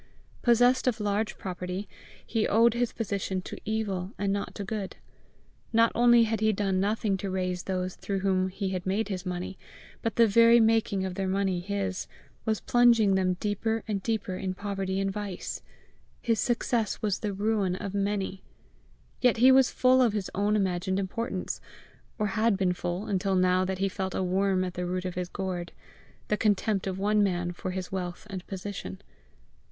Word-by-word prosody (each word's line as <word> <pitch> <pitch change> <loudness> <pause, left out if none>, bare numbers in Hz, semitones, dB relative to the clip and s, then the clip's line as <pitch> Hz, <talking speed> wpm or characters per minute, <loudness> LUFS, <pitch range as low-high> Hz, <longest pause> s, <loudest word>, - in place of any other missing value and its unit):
Possessed 245 +2 +4
of 240 -3 +1
large 210 +1 -1
property, 180 +1 -5 0.4
he 225 -2 0
owed 230 +2 +4
his 240 0 0
position 200 -3 -2
to - - -7
evil 205 -3 -2
and 200 -1 0
not 200 - -3
to 205 - -4
good. 200 -1 -4 0.8
Not 230 0 +4
only 240 -1 +6
had 225 -1 0
he 220 0 +4
done 195 -2 0
nothing 205 0 0
to 195 +1 -4
raise 185 -1 -2
those 185 -1 -2
through 195 -1 -3
whom 185 -1 +2
he 190 0 -3
made 200 +3 -1
his 185 -1 -4
money, 180 +1 -4 0.4
but 225 -2 -2
the 235 - +6
very 230 +2 +6
making 220 -4 +2
of 185 - -3
their 190 +1 -2
money 190 -1 0
his, 195 0 -3 0.4
was 220 -1 0
plunging 235 -4 +4
them 185 -1 +2
deeper 215 +3 -1
and 205 -3 -1
deeper 215 -3 -2
in 185 0 -3
poverty 195 -1 -2
and 195 0 0
vice: 200 -2 -5 0.6
his 230 -3 0
success 235 -1 0
was 205 -3 0
the 210 - -2
ruin 200 -2 0
of 190 +1 -5
many. 200 -1 -1 0.8
Yet 250 -2 +4 0.2
was 265 -1 +6
he - - -14
full 255 0 +5
of 235 -4 +3
his 205 -3 -3
own 205 +2 +1
imagined 190 -2 0
importance 195 0 -3 0.6
or 210 - 0
had 215 +1 +2
been 185 -2 +2
full 175 +3 -3
until 195 -1 0
now 185 0 +3
that 190 0 -2
he 195 +1 +1
felt 190 -1 -3
a - - 0
worm 190 +1 +1
at 180 -1 -4
the 180 0 -3
root 180 +1 -2
of 185 - -3
his 180 0 -4
gourd 185 -3 -4 0.5
the 210 - +1
contempt 205 -2 +1
of 190 -1 -2
one 210 +2 +2
man 175 -3 0
for 180 +1 -5
his 185 0 -4
wealth 180 -1 -4
and 185 -2 -6
position. 190 - -6
195 Hz, 180 wpm, -28 LUFS, 185-215 Hz, 0.8 s, only